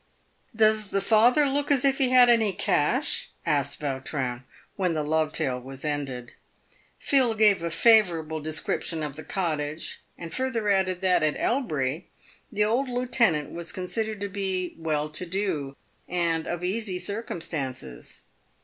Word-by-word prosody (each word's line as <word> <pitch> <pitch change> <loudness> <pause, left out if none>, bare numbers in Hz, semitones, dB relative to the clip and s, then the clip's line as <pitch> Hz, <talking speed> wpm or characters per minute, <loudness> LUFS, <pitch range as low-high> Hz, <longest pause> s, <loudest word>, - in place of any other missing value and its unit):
" - - -32
Does 215 -1 +2
the 195 - +1
father 235 +8 +4
look 285 +2 -1
as 280 -1 +3
if 270 0 +2
he 265 -2 +3
had 250 -1 +7
any 225 -4 +3
cash 160 -6 +1
?" - - -37
asked 140 -1 0
Vautrin, 130 -3 -3
w - - -27 0.4
r 190 - 0
hen 170 -2 +1
the 155 - -1
love 155 +1 0
tale 125 -4 -1
was 135 +3 -9
ended. 135 -5 -4 0.7
Phil 255 -5 +2
gave 210 -4 +4
a 170 - -2
favourable 165 -5 +3
description 155 +1 -2
of 145 -2 -5
the 155 - -8
cottage, 155 -4 -3 0.2
and 170 -2 -8
further 235 -5 -1
added 190 -2 +1
that, 180 -2 +3
at 155 -1 0
Elbury, 160 - -1 0.4
the 210 0 +1
old 245 +6 +1
lieutenant 240 - +1
was 170 0 -5
considered 215 +3 -3
to 200 - -1
be 190 -2 -3
well 155 -2 -1
to 155 +4 -2
do, 170 -7 -2 0.3
and 170 -2 0
of 175 0 -4
easy 195 0 -1
circumstances. 155 - -5
180 Hz, 160 wpm, -26 LUFS, 150-220 Hz, 0.7 s, had